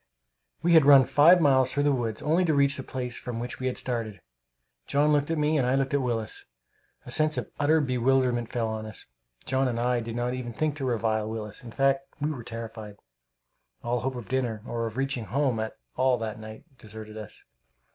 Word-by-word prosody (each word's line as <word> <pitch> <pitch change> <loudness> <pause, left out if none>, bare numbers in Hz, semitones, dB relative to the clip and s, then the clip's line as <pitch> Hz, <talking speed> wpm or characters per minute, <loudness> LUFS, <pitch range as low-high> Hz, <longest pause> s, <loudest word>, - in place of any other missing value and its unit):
We 170 0 +3
had 160 -2 +7
run 140 -2 +9
five 165 +8 +6
miles 130 -4 +3
through 145 - 0
the 145 - +3
woods, 115 -5 -2
only 165 +5 +2
to 160 -3 +2
reach 140 0 +3
the - - -4
place 125 -2 -4
from 120 -2 -5
which 120 +1 -5
we 130 - -2
had 125 - -2
started. 115 -5 -2 0.7
John 150 +2 +3
looked 145 0 +1
at 165 - 0
me, 150 +1 +2
and 125 - +1
I 130 - +2
looked 135 0 0
at 140 - +2
Willis. 115 -4 -2 0.6
A - - -8
sense 155 +3 +3
of - - -4
utter 155 +2 +3
bewilderment 125 -2 +1
fell 115 -2 -1
on 110 0 -4
us. 110 - -10 0.4
John 130 0 +1
and 120 -2 -2
I 125 0 +1
did 115 0 -5
not 120 +1 -1
even 125 -2 -5
think 155 +4 -1
to 135 - -3
revile 110 -3 0
Willis. 110 +2 -6
In 120 - -9
fact, 135 +2 +1
we 150 +2 -1
were 130 -6 -6
terrified. 115 -3 -8 0.9
All 120 +1 0
hope 130 +3 -3
of 120 -4 -7
dinner, 120 -5 -2
or 115 -1 -3
of 110 +2 -8
reaching 135 -4 -1
home 130 +2 0
at 110 0 -4 0.2
all 130 0 +2
that 110 -2 -5
night, 110 +2 -10 0.2
deserted 110 0 -9
us. 105 -1 -10
125 Hz, 215 wpm, -27 LUFS, 115-140 Hz, 0.9 s, run